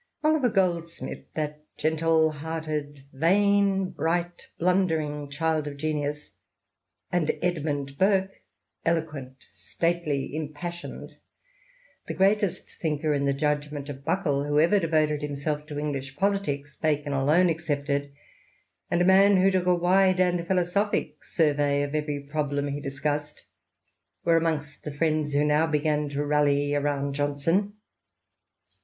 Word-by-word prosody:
Oliver 305 -5 +3
Goldsmith, 170 -5 -2
that 150 -1 -3
gentle 160 0 +2
hearted, 150 -2 -5
vain, 195 +4 +2
bright, 175 +2 -2
blundenng~~T^ild 160 -4 0
of 140 -1 -6
genius, 150 -1 -3 0.8
and 175 -3 +1
Kdmimd 145 -6 -2
pnrlrPj 190 +1 +2 0.5
eloquent, 155 -6 -3
stately, 150 - -2
impassioned 160 +3 -6 0.4
— - - -33
the - - -4
greatest 195 -1 +1
thinker, 155 -1 0
in 140 -1 0
the 140 - +2
judgment 145 0 -2
of 140 -1 -8
Buckle, 150 -4 0
who 145 0 +2
ever 175 +6 +4
devoted 155 -3 +1
himself 150 +1 -3
to 150 -1 -6
English 140 -3 -4
politics. 150 -8 -1
Bacon 150 -2 -1
alone 150 +7 +3
excepted, 145 -3 -1 0.8
and 175 0 +2
a - - +2
man 195 +1 +6
who 190 +1 +4
took 185 -1 0
a 180 - +5
wide 185 +1 +3
and 175 -2 +1
philosophic 190 +3 0
survey 145 -3 +1
of 145 0 -4
every 150 -1 -2
problem 145 0 -2
he 145 +1 -4
discussed 145 +2 -3 0.4
— - - -51
were 165 -1 +5
amongst 155 -3 -2
the 150 - -5
friends 155 0 0
who 145 +1 +3
now 150 +2 +3
began 150 -1 0
to 145 +1 -2
rally 145 -1 +2
around 140 -1 0
Johnson. 145 +8 0
155 Hz, 130 wpm, -26 LUFS, 145-175 Hz, 0.8 s, man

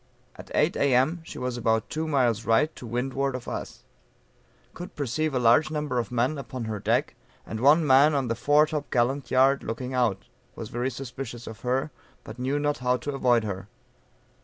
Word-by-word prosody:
At - - -12
8 - - +2
A.M. 140 +5 +2
she 160 - -10
was 125 -1 -3
about 110 -2 +1
two 160 +1 -2
miles 120 -7 +1
right 140 +8 +2
to 120 - -9
windward 135 +3 -2
of 125 - -7
us; - - -6 0.9
could 175 - -9
perceive 145 +2 -1
a - - +3
large 120 +6 +4
number 150 -5 -2
of 115 -2 -4
men 125 +5 0
upon 130 -2 -6
her 110 -2 -4
deck, - - 0 0.3
and 110 - -5
one 150 +6 +5
man 140 +2 +5
on 135 -3 0
the 115 - 0
fore 145 +6 +4
top 150 -2 -4
gallant 125 +1 0
yard 135 +2 +4
looking 125 +3 -5
out; 115 -7 0 0.3
was 110 -2 -7
very 120 +2 -2
suspicious 120 -1 -7
of 110 - -9
her, 130 +4 -1 0.3
but 110 +3 -10
knew 130 +3 0
not 145 0 -1
how 125 0 +1
to 145 +4 -5
avoid 125 -4 +2
her. 100 -2 -5
130 Hz, 190 wpm, -26 LUFS, 120-145 Hz, 0.9 s, one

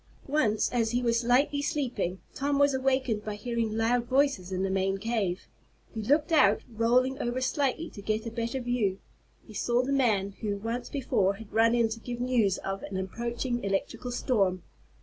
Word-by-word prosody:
Once, 260 -7 +2
as 230 -2 +1
he 245 +2 0
was 235 0 +2
lightly 270 +4 +3
sleeping, 250 - -2
Tom 280 +1 0
was 285 0 +4
awakened 260 -5 0
by 210 -1 -4
hearing 225 0 -2
loud 235 +2 +2
voices 260 -8 +1
in 185 0 -1
the 195 - 0
main 195 0 +1
cave. 205 -4 -2 0.5
He 220 - -4
looked 290 +8 +2
out, 210 -10 +5
rolling 245 +4 +2
over 240 0 -1
slightly 280 +4 0
to 200 - -10
get 215 +2 -1
a 230 - -4
better 235 +3 -2
view. 240 -6 0 0.5
He 220 - -13
saw 240 +4 +1
the 275 +2 -1
man 215 -8 +2
who, 205 -2 -1
once 230 +4 -4
before 200 -8 +1
had 220 0 -12
run 230 +1 +4
in 235 -1 +3
to 225 +1 -5
give 240 +1 -6
news 240 -6 +2
of 195 0 -4
an 195 -1 -5
approaching 235 +5 -3
electrical 200 +5 -2
storm. 195 -8 +1
235 Hz, 185 wpm, -28 LUFS, 205-255 Hz, 0.5 s, out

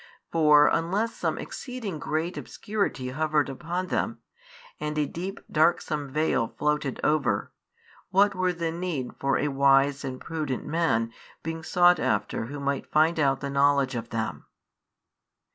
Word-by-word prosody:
For 150 -2 +6
unless 195 +8 0
some - - -1
exceeding 235 - -6
great 160 +4 -2
obscurity 200 -11 -3
hovered 150 +1 +1
upon 175 +7 -4
them, - - -1 0.6
and 150 0 -3
a 150 - +2
deep 185 +7 -5
darksome 150 -2 +1
veil 150 -5 +1
floated 150 -3 0
over, 130 -10 +1 0.6
what 200 +2 +4
were 185 -1 +1
the 165 -1 -2
need 165 -7 -3
for 135 0 +1
a 150 - 0
wise 140 0 +3
and 130 -1 -5
prudent 155 -6 -3
man 115 -8 0 0.3
being 160 0 -4
sought 175 +1 +4
after 105 +2 -1
who 145 +3 -6
might 140 -1 -2
find 160 +2 +3
out 135 -2 +2
the 140 -1 -3
knowledge 140 -1 +3
of 115 -1 -4
them? 110 -1 -3
150 Hz, 145 wpm, -27 LUFS, 135-170 Hz, 0.6 s, For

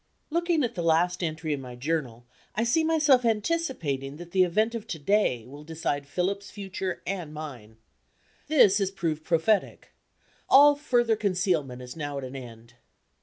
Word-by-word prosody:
Looking 340 -2 +1
at 240 -1 -1
the 175 - -4
last 170 +2 +2
entry 160 -1 -2
in 140 - -4
my 125 -1 -9
Journal, 125 -4 -3 0.3
I 230 - +1
see 245 +8 +2
myself 305 -5 +4
anticipating 210 - -1
that 175 +1 -10
the 185 0 +4
event 215 +6 +1
of 230 -1 -6
to 170 - -4
day 145 - +1
will 145 +4 -11
decide 150 -3 -3
Philip's 195 +6 -2
future 190 -3 -5
and 180 -5 -4
mine. 125 -8 -9 0.7
This 210 -10 +5
has 195 -2 +1
proved 165 -5 -3
prophetic. 170 +6 0 0.6
All 290 +2 +8
further 240 -6 +2
concealment 180 -11 -1
is 125 0 -9
now 145 -3 -4
at 140 - -5
an 130 +1 -7
end. 120 -2 -10
175 Hz, 165 wpm, -27 LUFS, 145-220 Hz, 0.7 s, All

